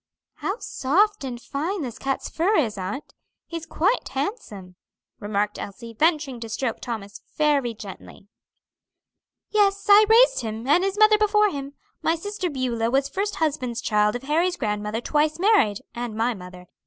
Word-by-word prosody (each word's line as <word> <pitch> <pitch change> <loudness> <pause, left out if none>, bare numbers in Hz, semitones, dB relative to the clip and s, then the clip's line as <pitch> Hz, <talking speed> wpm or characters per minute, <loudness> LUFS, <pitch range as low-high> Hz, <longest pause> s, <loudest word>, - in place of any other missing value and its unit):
"How 390 - -2
soft 405 - +1
and 250 -3 -5
fine 305 - -3
this 240 -3 -6
cat's 270 0 -2
fur 370 +7 +1
is, 225 -8 +1
aunt; 195 +9 -5 0.3
he's 330 -1 -7
quite 390 +11 0
handsome," 245 - -5 0.4
remarked 205 0 -1
Elsie, 230 +3 -8
venturing 300 -1 +1
to 230 -1 -7
stroke 230 +2 -2
Thomas 210 -5 -6 0.2
very 285 -6 +2
gently. 200 -1 -11 1.2
"Yes, 400 -2 +2
I 415 +1 +8
raised - - +6
him, 225 0 -5
and 340 +6 +4
his 390 +1 -1
mother 430 0 +6
before 420 -1 +3
him. 280 -1 -6 0.3
My 325 - +2
sister 395 +1 -4
Beulah 245 -5 -1
was 275 +2 +1
first 400 +6 -2
husband's 275 -7 -1
child 210 -1 +2
of 245 - -5
Harry's 335 +6 +1
grandmother 210 0 -2
twice 300 +3 +1
married, 365 - +3
and 240 -2 -5
my 230 +3 +1
mother. 180 -2 -11
275 Hz, 155 wpm, -24 LUFS, 225-365 Hz, 1.2 s, I